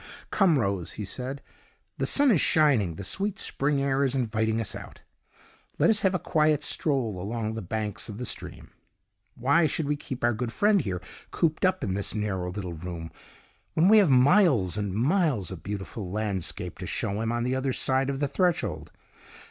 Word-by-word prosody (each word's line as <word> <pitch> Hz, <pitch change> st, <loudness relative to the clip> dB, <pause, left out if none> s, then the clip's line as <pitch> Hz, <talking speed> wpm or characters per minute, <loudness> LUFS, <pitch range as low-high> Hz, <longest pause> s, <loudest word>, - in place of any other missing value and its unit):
"Come, 185 Hz, -7 st, +4 dB
Rose," 100 Hz, -, -1 dB
he 105 Hz, -, -5 dB
said, 130 Hz, +7 st, -5 dB, 0.6 s
"the -, -, +1 dB
sun 285 Hz, -2 st, +4 dB
is 180 Hz, -, +4 dB
shining, 130 Hz, -, +3 dB
the 100 Hz, -, -7 dB
sweet 195 Hz, -, -2 dB
spring 140 Hz, +1 st, 0 dB
air 140 Hz, 0 st, +1 dB
is 135 Hz, -1 st, 0 dB
inviting 110 Hz, -3 st, 0 dB
us 110 Hz, -, -3 dB
out. -, -, -10 dB, 0.7 s
Let -, -, +4 dB
us 210 Hz, -, +2 dB
have 190 Hz, -1 st, +2 dB
a -, -, +3 dB
quiet 155 Hz, -3 st, +1 dB
stroll 120 Hz, -, -1 dB
along 110 Hz, +2 st, -3 dB
the 110 Hz, -, -4 dB
banks 105 Hz, +3 st, -4 dB
of 105 Hz, -, -7 dB
the 125 Hz, -, -4 dB
stream. -, -, -7 dB, 0.6 s
Why 140 Hz, +7 st, +3 dB
should 150 Hz, +1 st, -2 dB
we 150 Hz, -, +1 dB
keep 135 Hz, -3 st, -7 dB
our 120 Hz, 0 st, +3 dB
good 115 Hz, +1 st, -3 dB
friend 205 Hz, -, +3 dB
here 90 Hz, -4 st, -4 dB, 0.3 s
cooped 160 Hz, +1 st, 0 dB
up 185 Hz, 0 st, +1 dB
in 95 Hz, -, -1 dB
this 100 Hz, +3 st, -2 dB
narrow 95 Hz, -4 st, -2 dB
little 90 Hz, -2 st, -5 dB
room, 85 Hz, 0 st, -7 dB, 0.6 s
when 170 Hz, +4 st, +4 dB
we 220 Hz, 0 st, +8 dB
have 195 Hz, -6 st, +4 dB
miles 130 Hz, -, +4 dB
and 100 Hz, -2 st, -2 dB
miles 135 Hz, -, +1 dB
of 90 Hz, -4 st, -7 dB
beautiful 100 Hz, +1 st, -6 dB
landscape 100 Hz, -3 st, -3 dB
to -, -, -5 dB
show 100 Hz, +2 st, -2 dB
him 115 Hz, 0 st, -1 dB
on 120 Hz, 0 st, -1 dB
the 125 Hz, +1 st, 0 dB
other 130 Hz, 0 st, -1 dB
side 130 Hz, +1 st, +1 dB
of 135 Hz, -1 st, -2 dB
the 145 Hz, -, +1 dB
threshold? 175 Hz, +4 st, -1 dB
125 Hz, 190 wpm, -27 LUFS, 100-150 Hz, 0.7 s, we